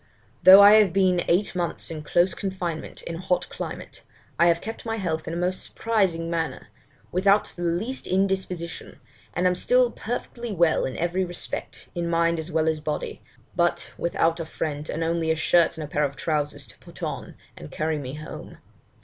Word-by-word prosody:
'Though 190 +2 +10
I 205 +1 +9
have 195 -5 +1
been 185 -2 +3
eight 185 +4 +2
months 175 -2 -2
in 155 -2 -5
close 175 +4 +2
confinement 180 -5 -4
in 165 - -5
a - - -7
hot 180 -1 0
climate, - - -7 0.4
I 170 - +6
have 170 -1 +3
kept 225 +5 -7
my 225 -1 -2
health 165 -7 -3
in 165 - -3
a - - -3
most 180 +1 -1
surprising 190 -7 0
manner, 165 -1 -3 0.4
without 200 +3 +3
the 175 - -9
least 175 +10 -2
indisposition, 185 -3 -2 0.4
and 180 - 0
am 180 - +4
still 250 +6 +3
perfectly 240 0 -5
well 170 -4 +2
in 130 - -4
every 175 +2 0
respect, 175 -1 -6
in 170 -1 -2
mind 170 0 +2
as 160 +2 -5
well 160 -1 +1
as 160 -1 +1
body; 150 0 -4 0.3
but - - 0
without 165 0 0
a 165 - -3
friend, 150 -1 -4
and 165 - -2
only 165 0 0
a 160 - +3
shirt 165 +2 +3
and 155 -2 -5
pair 150 - +1
of 140 -1 -1
trousers 150 -2 -2
to - - -16
put - - -13
on, - - -5 0.2
and 75 - -10
carry 155 0 -2
me 135 0 -6
home. 155 +1 -9
170 Hz, 190 wpm, -25 LUFS, 160-190 Hz, 0.4 s, Though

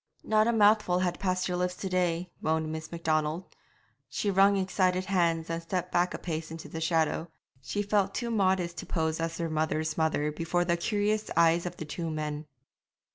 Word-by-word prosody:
'Not 215 0 +3
a - - +4
mouthful 210 -4 +4
has 180 -1 +1
passed 185 -1 0
her 180 - -1
lips 180 0 -1
to 190 - -5
day,' 180 -1 0
moaned 160 0 0
Miss 160 0 -6
Macdonald. 160 0 -1 0.6
She 205 - -1
wrung 195 +1 +5
excited 185 -1 +1
hands 170 -4 +1
and 165 0 -3
stepped 180 +1 -3
back 175 +1 +1
a - - -3
pace 160 -2 -4
into 160 0 -8
the 160 - -6
shadow; 160 0 +1 0.3
she 205 +9 -2
felt 200 -1 +1
too 235 -1 -2
modest 185 -5 +1
to - - -7
pose 160 -2 -1
as 165 0 -2
her 170 - -1
mother's 155 0 -1
mother 155 -2 +1
before 170 +3 0
the 170 -1 +2
curious 210 +4 0
eyes 170 +1 +4
of 175 - -7
the 160 - -5
two 165 +3 -4
men. 150 -1 -4
170 Hz, 190 wpm, -29 LUFS, 160-185 Hz, 0.6 s, wrung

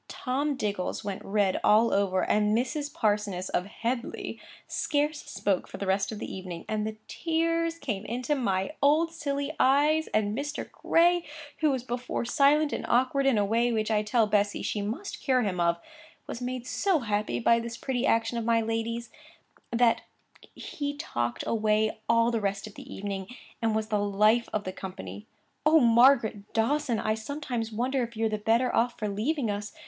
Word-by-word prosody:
Tom 280 +3 -1
Diggles 205 -4 -2
went 200 -2 -5
red 200 -2 +1
all 220 +2 +5
over; 190 -2 +2
and 210 +1 +2
Mrs. 285 +4 -2
Parsoness 205 - 0
of 180 - -1 0.2
Headleigh 235 +1 -3 0.3
scarce 295 0 0
spoke 195 -3 -1
for - - -8
the 200 - -4
rest 195 +1 +1
of 215 - -5
the - - -5
evening; 185 -3 -7
and 215 0 -1
the 215 0 -6
tears 330 0 0
came 215 -11 -3
into 250 +5 -1
my 195 -7 0
old 310 +4 +4
silly 285 -1 -3
eyes; 295 +4 +4
and 210 -1 0
Mr. 290 +3 -4
Gray, 345 +1 +3 0.4
who 310 - +3
was 260 -3 -1
before 245 -1 -3
silent 285 +4 +3
and - - -3
awkward 260 +3 +2
in 260 -5 +4
a 205 - +3
way 230 +4 +2
which 220 -1 0
I 210 -1 +3
tell 215 +2 +2
Bessy 205 -1 +1
she 210 - -2
must 235 - -5
cure 255 -3 +2
him 185 -4 -2
of, 170 0 +2 0.5
was 235 - -6
made 250 0 -4
so 365 +2 +1
happy 210 - -1
by 230 - +4
this 235 0 -6
pretty 260 -2 -2
action 230 +1 +1
of - - -3
my 230 0 +3
lady's, 225 +1 -2 0.6
that 235 0 +3 0.5
he 285 -1 -5
talked 120 - -2
away 215 -1 +1
all 230 0 +4
the 230 -2 -1
rest 200 0 -2
of 215 - -10
the - - -11
evening, 195 -1 -4 0.3
and 225 -1 +1
was 220 0 -1
the 210 - +1
life 210 +3 +3
of 210 - -1
the 185 - -5
company. 100 - -8 0.4
'Oh, 310 +2 +6
Margaret 235 -4 +4
Dawson! 235 +1 +1
I 215 - 0
sometimes 235 -1 -4
wonder 255 +4 0
if 235 -2 -5
you're 225 0 +1
the 215 0 -2
better 230 +4 +2
off 240 +1 +1
for 215 - -2
leaving 225 +4 -1
us. 205 0 -5
230 Hz, 185 wpm, -28 LUFS, 210-270 Hz, 0.6 s, Oh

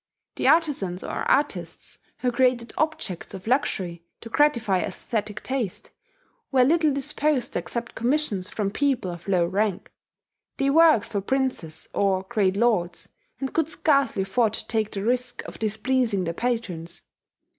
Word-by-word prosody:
The - - 0
artizans 275 - +2
or - - -3
artists 290 +1 -1 0.2
who 250 - +1
created 245 -1 +1
objects 310 - -2
of 185 - -10
luxury, 190 -9 0 0.2
to 230 - -9
gratify 235 -9 +2
aesthetic 210 +2 -4
taste, 255 -8 -3 0.6
were 260 -2 +5
little 310 +3 +3
disposed 280 -1 0
to - - 0
accept 235 +6 -5
commissions 235 -6 0
from 205 -2 -2
people 260 -8 0
of 175 +1 -10
low 180 -3 +3
rank: 195 +1 -1 0.7
they 275 0 +2
worked 320 -6 +6
for 200 - -3
princes, 225 -10 -2
or 190 -2 +1
great 195 -2 +1
lords, 205 -7 +1 0.3
and 270 -1 -4
could 320 -1 +1
scarcely 280 -10 +2
afford 215 +2 +1
to - - -3
take 220 -2 0
the 195 - -5
risk 245 +2 -1
of - - -9
displeasing 220 -1 +1
their 165 -1 -2
patrons. 185 -7 -3
230 Hz, 145 wpm, -25 LUFS, 195-265 Hz, 0.7 s, worked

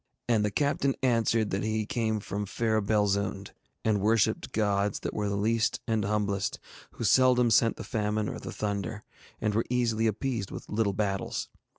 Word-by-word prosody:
And 115 -3 +3
the 105 - +1
captain 140 +3 +1
answered 115 -3 +2
that 95 - -1
he 110 0 -1
came 110 -3 -1
from 100 +1 -4
fair 110 +1 0
Belzoond, 100 -1 0 0.3
and 105 -3 +2
worshipped 110 +1 +2
gods 100 -1 0
that - - -3
were 105 -1 -1
the 100 - -1
least 110 +1 +1
and 110 -2 +1
humblest, 100 -1 -1 0.4
who - - -6
seldom 125 -2 +4
sent 115 +1 +4
the - - -7
famine 105 -1 -1
or - - -4
the - - -7
thunder, 105 +1 -3 0.4
and 105 - 0
were 115 +2 +1
easily 115 -2 +1
appeased 110 -1 -2
with - - -8
little 105 -2 +1
battles. 100 -1 -2
110 Hz, 175 wpm, -28 LUFS, 100-115 Hz, 0.4 s, seldom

